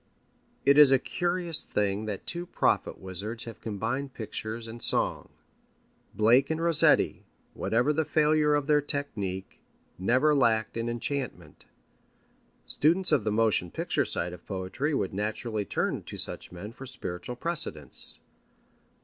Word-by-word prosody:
It 140 +1 +6
is 145 -2 +9
a 135 - +7
curious 175 +3 -1
thing 105 +1 -1
that 105 -3 -5
two 175 +1 -3
prophet - - +1
wizards 100 +5 -4
have 115 - -9
combined 115 +6 -3
pictures 110 +1 -5
and 115 +1 -9
song. - - 0 0.9
Blake 115 +5 +4
and 160 0 -1
Rossetti, 165 -2 +4 0.3
whatever 120 +7 +1
the 160 +2 +1
failure 150 -1 +3
of 145 -1 0
their 150 0 +4
technique, 100 -10 -4 0.4
never 130 +10 +3
lacked 110 -6 +2
in 115 0 -2
enchantment. 120 - -4 1.0
Students 170 +4 +2
of 140 -9 +3
the 105 - +1
motion 105 -5 +2
picture - - -1
side 85 +1 0
of 90 - -11
poetry 100 +10 -2
would 95 -8 -1
naturally 110 +1 -2
turn - - -1
to - - -7
such - - -2
men 90 +5 -8
for 135 +3 -10
spiritual 125 -3 -6
precedents. 125 - -1
120 Hz, 140 wpm, -28 LUFS, 105-145 Hz, 1.0 s, is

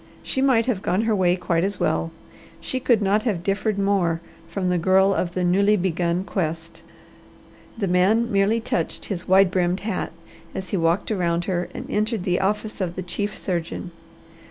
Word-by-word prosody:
She 265 - -1
might 255 -4 +3
have 230 -7 -1
gone 185 +2 +1
her 225 -1 +2
way 180 -2 +3
quite 175 -2 0
as 200 0 -2
well. 165 - 0 0.5
She 260 +9 -3
could 235 -4 +2
not 200 +2 +2
have 205 -8 -2
differed 200 +2 0
more 195 -5 +1 0.3
from 180 +2 -1
the 180 - +1
girl 190 +3 +4
of 175 -2 -2
the 185 - 0
newly 200 +4 +3
begun 175 -1 0
quest. 165 -3 -4 1.0
The 200 -3 -1
man 195 +6 +3
merely 200 +3 +2
touched 245 +2 -2
his 185 -4 -4
wide 190 0 +5
brimmed 180 0 +1
hat 205 -3 -3 0.4
as 190 -1 -5
he - - -1
walked 170 +5 +1
around 175 -4 0
her 180 -2 -2
and - - -5
entered 215 -1 -1
the 180 -2 +1
office 210 +2 -1
of 175 -2 -2
the 185 - -4
chief 205 +4 -3
surgeon. 175 0 -4
190 Hz, 180 wpm, -23 LUFS, 175-210 Hz, 1.0 s, wide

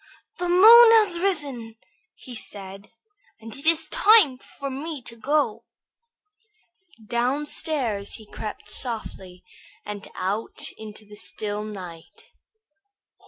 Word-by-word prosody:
"The 355 0 -2
moon 450 +6 +8
has 415 -6 +4
risen," 285 - -2 0.4
said 200 -5 -7
he, - - -33 0.5
"and 225 0 -10
it 280 +3 -7
is 325 -1 +3
time 425 - +5
for 275 +1 -8
me 295 +3 -6
to 235 - -10
go." 235 -3 -1 1.4
Downstairs 245 -2 -2
he 220 - -12
crept 210 +1 -8
softly 195 -7 -3 0.4
and 205 -1 -7
out 200 +5 -4
into 215 0 -11
the 210 0 -14
still 210 0 -4
night. 180 -6 -11
235 Hz, 110 wpm, -24 LUFS, 210-310 Hz, 1.4 s, moon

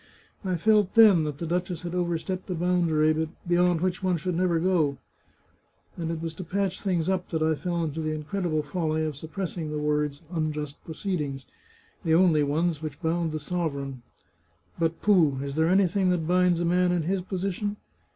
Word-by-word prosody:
I 185 -2 0
felt 210 +1 +3
then 205 -8 +7
that 150 -2 -4
the 170 - -4
duchess 175 0 -2
had 175 0 -4
overstepped 180 +1 -2
a 180 - -1
boundary 160 -3 +2 0.2
beyond 175 -1 +3
which 180 -1 -1
one 185 -2 +1
should 180 +3 -2
never 170 -1 +1
go, 165 -6 +1 1.0
and 165 -2 -4
it 165 -1 -3
was 165 0 -4
to 185 - -7
patch 190 +1 -2
things 180 -5 0
up 185 -1 -1
that 160 -2 -1
I 160 0 +3
fell 170 +3 -2
into 160 0 -3
the 155 - -1
incredible 155 0 -2
folly 155 -1 -1
of 155 -2 -3
suppressing 160 +1 -5
the 150 - -3
words 150 0 -1
'unjust 150 -3 -3
proceedings,' 150 -6 -3 0.6
the 160 -2 +3
only 170 -3 +5
ones 155 +2 0
which 155 -3 -6
bound 165 -1 0
the 155 - -3
sov 170 0 -2
ereign. 135 -2 -6 0.8
But 165 0 -1
pooh! 170 -10 +4
is 140 -1 -4
there 160 +2 +2
anything 190 0 +3
that 175 -3 +1
binds 180 0 +3
a - - +1
man 180 +1 +3
in 175 -2 +1
his 185 +3 0
position 195 +2 -3
170 Hz, 185 wpm, -26 LUFS, 155-180 Hz, 1.0 s, then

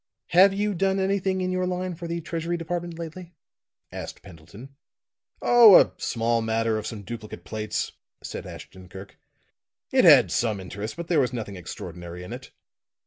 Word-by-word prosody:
"Have 185 +3 +6
you 205 +1 -1
done 195 +1 +1
anything 190 -1 0
in 185 0 -1
your 185 0 -1
line 180 0 -3
for 170 +1 -7
the 170 0 -3
Treasury 165 +2 -3
Department 170 0 -4
lately?" 170 +1 -8 0.6
asked - - -8
Pendleton. 100 +8 -13 0.7
"Oh, 235 -5 +8
a - - +3
small 115 0 0
matter 110 0 0
of - - -6
some 105 -3 -7
duplicate 115 0 -8
plates," 110 -1 -3 0.3
said - - -7
Ashton 95 -1 -11
Kirk. 95 +1 -12 0.7
"It - - +4
had - - +7
some 110 -4 0
interest, 100 - -7
but 170 -1 -6
there 170 -3 +2
was 125 -2 +1
nothing 110 -5 -5
extraordinary 90 0 -8
in 90 - -8
it." - - -9
150 Hz, 165 wpm, -25 LUFS, -, 0.7 s, Oh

